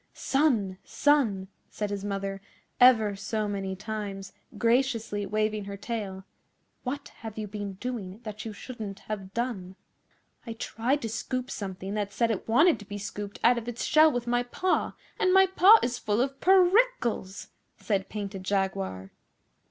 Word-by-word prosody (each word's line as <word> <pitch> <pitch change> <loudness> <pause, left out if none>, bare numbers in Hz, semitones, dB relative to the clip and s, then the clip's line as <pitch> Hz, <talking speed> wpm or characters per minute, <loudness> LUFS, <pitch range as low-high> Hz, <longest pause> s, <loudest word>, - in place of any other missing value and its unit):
'Son, 230 -10 +1
son!' 235 -11 +2 0.2
said 210 -1 -4
his 200 -1 -3
mother 195 -1 -3 0.4
ever 225 -5 +6
so 215 +2 -2
many 195 -2 -3
times, 200 -1 -5 0.2
graciously 230 -4 +1
waving 215 -1 -1
her 200 0 -6
tail, 200 -3 -5 0.6
'what 280 +3 -5
have 220 -1 -8
you 215 -1 -3
been 205 -1 -5
doing 205 -2 -5
that 215 -1 -6
you 225 - -5
shouldn't 210 -2 -7
have 195 -3 -6
done?' 215 -7 -3 0.7
'I 230 - -4
tried 240 +5 -1
to - - -1
scoop 255 +3 -3
something 190 -1 -5
that 205 -1 -2
said 230 +3 +1
it 215 - -4
wanted 310 +9 +5
to 205 - -11
be 205 +1 -6
scooped 205 0 -6
out 240 0 +5
of 230 - -11
its 240 -1 -3
shell 310 0 +6
with 245 -2 -2
my 245 0 +1
paw, 305 +10 0 0.3
and 370 - +3
my 385 +1 +7
paw 380 +3 +7
is 245 0 -1
full 210 +1 0
of 270 +2 -1
per 375 -1 +6
ickles,' 370 - +1 0.3
said 195 -3 -1
Painted 200 -2 -5
Jaguar. 95 - -2
215 Hz, 160 wpm, -28 LUFS, 200-245 Hz, 0.7 s, my